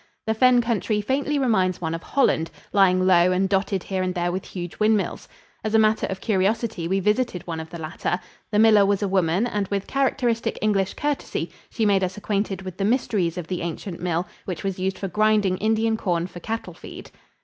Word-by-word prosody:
The 220 Hz, -, +1 dB
fen 250 Hz, +2 st, +5 dB
country 225 Hz, -2 st, 0 dB
faintly 275 Hz, +7 st, 0 dB
reminds 190 Hz, -9 st, +1 dB
one 160 Hz, -2 st, -2 dB
of 165 Hz, -, -4 dB
Holland, 180 Hz, -, +1 dB, 0.2 s
lying 185 Hz, -2 st, +4 dB
low 180 Hz, -1 st, +5 dB
and 185 Hz, +1 st, +2 dB
dotted 195 Hz, -1 st, 0 dB
here 190 Hz, -1 st, -2 dB
and 185 Hz, 0 st, -2 dB
there 175 Hz, 0 st, 0 dB
with 185 Hz, +1 st, -4 dB
huge 175 Hz, -2 st, -7 dB
windmills. 215 Hz, -1 st, +1 dB, 0.4 s
As 215 Hz, 0 st, -1 dB
a -, -, +7 dB
matter 215 Hz, 0 st, +3 dB
of 190 Hz, 0 st, -5 dB
curiosity, 210 Hz, -2 st, 0 dB
we 190 Hz, +2 st, +1 dB
visited 210 Hz, -1 st, 0 dB
one 165 Hz, -2 st, -4 dB
of 160 Hz, 0 st, -7 dB
the 170 Hz, -, -7 dB
latter. 160 Hz, +2 st, -3 dB, 0.3 s
The 210 Hz, -, 0 dB
miller 215 Hz, -1 st, +6 dB
was 200 Hz, +1 st, +1 dB
a -, -, +1 dB
woman, 185 Hz, +1 st, +2 dB
and 210 Hz, -4 st, -2 dB
with 200 Hz, 0 st, -2 dB
characteristic 255 Hz, -4 st, 0 dB
English 200 Hz, -3 st, +1 dB
courtesy 290 Hz, -1 st, -2 dB, 0.2 s
she 225 Hz, -, -1 dB
made 200 Hz, -2 st, +3 dB
us 185 Hz, +1 st, -2 dB
acquainted 200 Hz, -2 st, -2 dB
with 185 Hz, -1 st, -7 dB
the 195 Hz, -, -1 dB
mysteries 210 Hz, -7 st, 0 dB
of 175 Hz, -, -4 dB
the 180 Hz, +2 st, -4 dB
ancient 170 Hz, +2 st, -5 dB
mill, 175 Hz, 0 st, 0 dB, 0.2 s
which 185 Hz, -, -5 dB
was 195 Hz, -1 st, -3 dB
used 190 Hz, +1 st, -1 dB
for 195 Hz, -, -3 dB
grinding 210 Hz, -1 st, +2 dB
Indian 220 Hz, +1 st, +1 dB
corn 175 Hz, -5 st, 0 dB
for 180 Hz, -1 st, -9 dB
cattle 225 Hz, +5 st, -4 dB
feed. -, -, -11 dB
195 Hz, 205 wpm, -24 LUFS, 180-220 Hz, 0.4 s, a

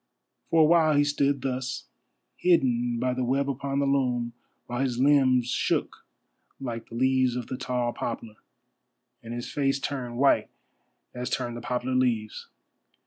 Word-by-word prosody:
For 165 Hz, -, +4 dB
a -, -, +6 dB
while 160 Hz, -1 st, +4 dB
he 145 Hz, -, +5 dB
stood 140 Hz, -1 st, +1 dB
thus, 130 Hz, -1 st, -3 dB, 0.5 s
hidden 125 Hz, -9 st, +2 dB
by 125 Hz, +1 st, 0 dB
the 130 Hz, 0 st, -2 dB
web 135 Hz, +3 st, +1 dB
upon 140 Hz, 0 st, -2 dB
the 140 Hz, -, +2 dB
loom, 125 Hz, -4 st, 0 dB, 0.3 s
while 120 Hz, 0 st, -4 dB
his 130 Hz, -3 st, 0 dB
limbs 130 Hz, -2 st, +4 dB
shook -, -, -1 dB, 0.5 s
like 115 Hz, -4 st, -5 dB
the 115 Hz, -, -9 dB
leaves 130 Hz, 0 st, +2 dB
of 125 Hz, -2 st, -3 dB
the 130 Hz, -, -5 dB
tall 125 Hz, -2 st, -2 dB
poplar, 115 Hz, -2 st, -5 dB, 0.8 s
and 115 Hz, -, -9 dB
his 120 Hz, 0 st, -5 dB
face 140 Hz, -1 st, +1 dB
turned 130 Hz, -4 st, -4 dB
white 140 Hz, +2 st, +3 dB, 0.6 s
as 125 Hz, +1 st, -4 dB
turn 120 Hz, -2 st, -2 dB
the 120 Hz, -, -7 dB
poplar 125 Hz, +1 st, -2 dB
leaves. 120 Hz, -4 st, 0 dB
130 Hz, 155 wpm, -27 LUFS, 120-140 Hz, 0.8 s, a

